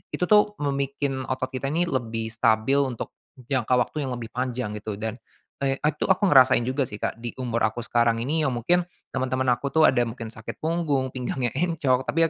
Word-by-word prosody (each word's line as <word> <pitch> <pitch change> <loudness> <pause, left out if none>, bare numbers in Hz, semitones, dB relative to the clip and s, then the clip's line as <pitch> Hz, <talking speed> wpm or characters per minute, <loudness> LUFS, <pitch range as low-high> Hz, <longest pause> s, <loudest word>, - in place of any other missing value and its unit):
itu - - -2
tuh 210 0 +5
membikin 140 -1 -2
otot 130 0 -2
kita 130 +1 -3
ini 160 +5 +1
lebih 115 -8 -2
stabil 115 +3 +2
untuk 120 -3 -5 0.2
jangka 130 -1 0
waktu 135 +3 0
yang 125 - -3
lebih 115 -1 -7
panjang 125 -3 -2
gitu, 105 0 -5
dan, 110 +1 -3 0.5
eee, 135 -1 +1
t - - -31
itu 150 - -2
aku 190 +2 +3
ngerasain 130 -3 +6
juga 130 +1 0
sih - - -6
Kak 110 - -3
di 120 - -3
umur 120 -3 -1
aku 120 +2 -6
sekarang 120 -1 +2
ini 155 +5 0
ya 150 - +2
mungkin, 130 +9 +2 0.3
teman-teman 130 0 -1
aku 140 +3 -3
tuh 160 0 +6
ada 120 - +2
mungkin 115 -1 -7
sakit 110 0 -9
punggung, 155 -5 0
pinggangnya 125 -1 -2
encok. 140 -6 +1
Tapi 165 +1 +2
130 Hz, 200 wpm, -25 LUFS, 120-140 Hz, 0.5 s, ngerasain